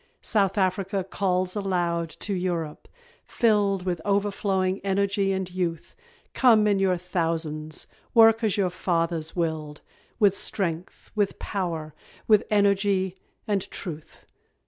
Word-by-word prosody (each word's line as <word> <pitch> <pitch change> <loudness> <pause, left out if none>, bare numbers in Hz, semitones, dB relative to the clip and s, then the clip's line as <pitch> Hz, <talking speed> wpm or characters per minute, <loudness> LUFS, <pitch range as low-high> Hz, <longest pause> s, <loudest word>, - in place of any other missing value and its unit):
South 200 -2 +1
Afric 190 0 0
calls 185 -1 0
aloud 175 -4 -1
to 200 - -5
Europe, 175 -4 -3 0.4
filled 205 -5 +1
With 175 -3 -2
overflowing 200 -2 0
energy 200 0 +1
and 190 -1 -1
youth, 170 -3 -3 0.4
Come 225 -5 +5
in 205 -2 +2
your 190 -2 +2
thousands 165 -3 -2 0.3
work 225 0 +6
as 215 -3 +1
your 190 -3 +1
fathers 165 -3 -1
willed, 155 -3 -3 0.4
With 205 -3 +4
strength, 175 -4 -2
with 205 -2 0
power, 165 -6 -3 0.3
with 215 -2 +5
energy 200 -2 +2 0.3
and 200 -3 -1
truth. 160 -4 -8
190 Hz, 120 wpm, -25 LUFS, 170-200 Hz, 0.4 s, work